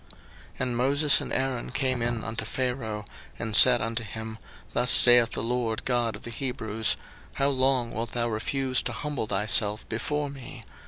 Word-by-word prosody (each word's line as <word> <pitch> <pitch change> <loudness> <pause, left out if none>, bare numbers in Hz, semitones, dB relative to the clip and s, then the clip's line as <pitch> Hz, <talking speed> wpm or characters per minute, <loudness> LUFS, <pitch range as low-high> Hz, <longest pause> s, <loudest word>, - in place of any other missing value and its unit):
02:010:003 - - -16 0.4
And 125 -2 -1
Moses 140 +2 +4
and - - -6
Aaron 130 -2 -2
came 130 -3 -1
in 120 -1 -2
unto 110 +1 -4
Pharaoh, 120 -5 -3 0.3
and 110 -2 -4
said 125 0 +6
unto 115 +1 -3
him, 110 0 -7 0.3
Thus 125 - +1
saith 120 -1 +7
the - - -3
LORD 115 -1 -2
God 120 -4 0
of 105 - -12
the 120 - -7
Hebrews, 115 -3 -2 0.4
How 140 +1 +1
long 130 -3 +1
wilt 115 +1 -4
thou 120 -1 0
refuse 130 +4 -1
to - - -4
humble 145 -7 -4
thyself 105 +1 +2
before 145 +5 -2
me? 135 -4 -9
120 Hz, 170 wpm, -27 LUFS, 110-130 Hz, 0.4 s, saith